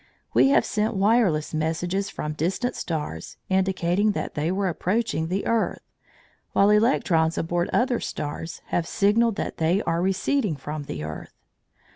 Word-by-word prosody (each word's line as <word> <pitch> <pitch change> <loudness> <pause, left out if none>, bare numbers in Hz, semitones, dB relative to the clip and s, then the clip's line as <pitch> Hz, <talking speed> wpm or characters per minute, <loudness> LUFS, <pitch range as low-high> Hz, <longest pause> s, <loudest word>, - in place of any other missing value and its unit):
We - - +5
have 275 -4 +4
sent 215 +1 -1
wireless 195 -7 +2
messages 175 +5 -1
from 150 -5 -4
distant 190 - -1
stars, 150 - -4
indicating 190 +1 +1
that - - -4
they 155 +3 -1
were 195 +1 0
approaching 185 -1 -1
the 190 +4 -2
earth, 230 -1 0 0.7
while 200 +1 +5
electrons 185 -8 +3
aboard 175 +1 -1
other 245 -1 +2
stars 155 +2 -5
have 170 -1 0
signalled 225 +1 +2
that - - -4
they 165 +4 +2
are 165 +1 0
receding 195 - 0
from 145 +2 -6
the 75 - -5
earth. 80 0 -7
185 Hz, 145 wpm, -25 LUFS, 160-210 Hz, 0.7 s, We